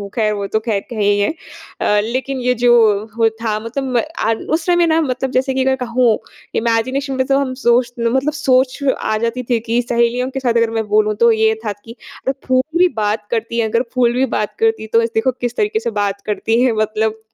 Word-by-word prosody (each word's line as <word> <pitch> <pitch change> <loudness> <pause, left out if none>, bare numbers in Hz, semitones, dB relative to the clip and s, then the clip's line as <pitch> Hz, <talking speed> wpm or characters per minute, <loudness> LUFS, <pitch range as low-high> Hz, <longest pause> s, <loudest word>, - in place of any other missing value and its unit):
ख़ैर 215 -2 +1
वो 200 -1 -3
तो 220 - 0
ख़ैर 220 -1 -2
एक 200 - -8
है 215 - -3
ही 205 0 +3
है। 205 - +1 0.5
अ, 210 - +3
लेकिन 260 +4 -3
ये 250 0 +2
जो 240 -1 +6 0.4
हो 225 -1 +4
था 215 -2 -1
मतलब 230 +5 -4
म - - +3 0.2
आ 225 - +2 0.2
उस 325 +1 0
समय 350 -1 +3
ना 320 0 +3
मतलब 265 -2 -2
जैसे 265 +1 0
कि 260 0 +1
अगर 265 0 +3
कहूँ, 245 -3 +1 0.4
इमेजिनेशन 255 +5 0
में 260 0 0
तो 275 - +3
हम 270 -2 -2
सोच 240 0 +3
मतलब 265 +6 +1
सोच 260 -3 +2 0.2
आ 215 - -1
जाती 235 +3 -2
थी 240 -2 +2
कि 230 +2 0
सहेलियों 240 +1 0
के 270 0 -4
साथ 250 -3 0
अगर 230 -1 +2
मैं 225 -1 -2
बोलूँ, 215 0 +2
तो 235 +2 +4
ये 220 0 +3
था 210 - 0
कि 230 0 -10 0.3
अगर 265 - +2
फूल 255 0 +3 0.2
भी 365 - +6
बात 210 0 -1
करती 230 0 -2
हैं 225 - +1
अगर 230 +2 +1
फूल 245 -2 +2
भी 255 +2 +2
बात 210 -4 -3
करती 450 - +1
तो 230 - +5
इस 230 - -1
देखो, 225 +4 +1
किस 245 -1 -4
तरीके 425 +1 +1
से - - -2
बात 200 -1 -2
करती 225 +3 0
हैं 255 -1 +3
मतलब 220 +1 -1
235 Hz, 230 wpm, -17 LUFS, 220-260 Hz, 0.5 s, जो